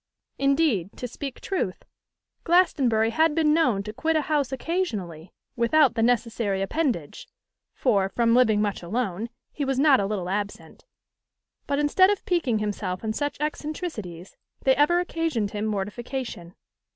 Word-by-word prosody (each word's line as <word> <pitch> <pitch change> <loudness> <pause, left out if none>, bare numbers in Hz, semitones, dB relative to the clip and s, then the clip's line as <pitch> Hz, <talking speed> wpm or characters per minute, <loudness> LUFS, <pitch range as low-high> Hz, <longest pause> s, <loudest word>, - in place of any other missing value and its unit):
Indeed, 275 - +2
to 250 - -4
speak 270 +2 -7
truth, 345 - -3 0.6
Glastonbury 265 -11 +3
had 315 +4 +2
been 310 -2 +3
known 250 -12 +2
to 210 +1 -7
quit 320 +8 0
a 310 - +3
house 290 -3 0
occasionally 215 - -3 0.2
without 255 +3 +4
that 230 - -1
necessary 230 -4 +1
appendage, 235 - -2 0.5
for, 200 -7 +2
from 230 +3 +2
living 220 -4 +4
much 205 -2 -2
alone, 210 +2 -3 0.2
he 295 - -3
was 270 -1 -1
not 280 -1 +5
a 200 - 0
little 195 -4 -3
absent; 205 +2 -5 0.8
but 280 - 0
instead 295 +6 +4
of 410 -1 -1
piquing 325 -11 +1
himself 205 -3 -3
on 220 -1 -1
such 290 +3 -3
eccentricities, 295 - -5 0.3
they 265 -1 +4
ever 300 +5 +3
occasioned 325 - -1
him 210 0 -2
mortification. 210 -2 -4
240 Hz, 145 wpm, -25 LUFS, 205-300 Hz, 0.8 s, not